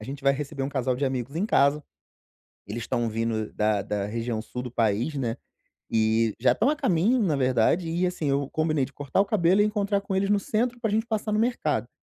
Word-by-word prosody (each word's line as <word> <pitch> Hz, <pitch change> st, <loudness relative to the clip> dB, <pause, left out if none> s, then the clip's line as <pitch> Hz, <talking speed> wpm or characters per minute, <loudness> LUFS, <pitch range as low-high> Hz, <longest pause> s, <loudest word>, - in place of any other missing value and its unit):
a -, -, -9 dB
gente 135 Hz, +3 st, -7 dB
vai 140 Hz, -, +5 dB
receber 140 Hz, -1 st, -4 dB
um -, -, -2 dB
casal 130 Hz, -2 st, -1 dB
de 140 Hz, -, -1 dB
amigos 130 Hz, +1 st, -3 dB
em 190 Hz, +5 st, 0 dB
casa, 145 Hz, -6 st, +3 dB, 0.8 s
eles 110 Hz, +3 st, -5 dB
estão 120 Hz, 0 st, -1 dB
vindo 110 Hz, -1 st, -2 dB
da 105 Hz, -1 st, +1 dB
da 100 Hz, 0 st, -2 dB
região 115 Hz, +1 st, -3 dB
sul 125 Hz, +2 st, -6 dB
do 125 Hz, -, -6 dB
país, 115 Hz, +5 st, 0 dB
né, 120 Hz, -4 st, -2 dB, 0.5 s
e 110 Hz, 0 st, +2 dB
já 125 Hz, -, +4 dB
estão 230 Hz, -, +1 dB
a 305 Hz, -, 0 dB
caminho 215 Hz, -, +2 dB
na 165 Hz, -8 st, +1 dB
verdade 130 Hz, +6 st, +2 dB
e, 175 Hz, +3 st, 0 dB
assim, 170 Hz, -5 st, -2 dB
eu 140 Hz, 0 st, 0 dB
combinei 155 Hz, -3 st, +1 dB
de 135 Hz, -, -10 dB
cortar 145 Hz, +5 st, -1 dB
o -, -, +4 dB
cabelo 190 Hz, -1 st, +3 dB
e -, -, +3 dB
encontrar 205 Hz, -1 st, 0 dB
com 195 Hz, -, -4 dB
eles 195 Hz, +1 st, +1 dB
no 205 Hz, -1 st, +3 dB
centro 240 Hz, +4 st, -1 dB
pra 225 Hz, -3 st, 0 dB
gente 220 Hz, +2 st, 0 dB
passar 215 Hz, -1 st, -2 dB
no 210 Hz, -, +1 dB
mercado. 155 Hz, -, 0 dB
140 Hz, 230 wpm, -26 LUFS, 115-195 Hz, 0.8 s, vai